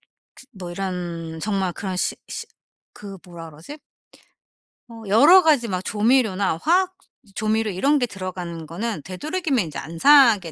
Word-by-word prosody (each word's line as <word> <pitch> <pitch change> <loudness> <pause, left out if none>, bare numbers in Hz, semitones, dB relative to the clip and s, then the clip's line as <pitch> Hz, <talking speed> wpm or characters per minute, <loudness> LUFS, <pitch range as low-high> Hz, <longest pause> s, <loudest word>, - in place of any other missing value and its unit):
시 260 - -22
뭐 180 -2 -7
이런 175 -3 -5
정말 195 -3 -1
그런 190 -2 -5
시 - - -1
시 455 - -6 0.5
그 200 -2 -10
뭐라 170 -2 -10
그러지? 160 - -11 1.1
어 225 -1 -11
여러 290 - +7
가지 285 -7 +3
막 185 -1 -2
조 210 - -5
조미료나 210 -7 +2
화학 365 +4 +2 0.4
조미료 220 0 0
이런 280 +11 +1
게 250 - +1
들어가는 180 -6 -7
거는 195 +2 -4
되도록이면 275 - -2
이제 150 - -7
안 165 +1 -8
사게 230 - +5
200 Hz, 290 characters per minute, -22 LUFS, 175-260 Hz, 1.1 s, 여러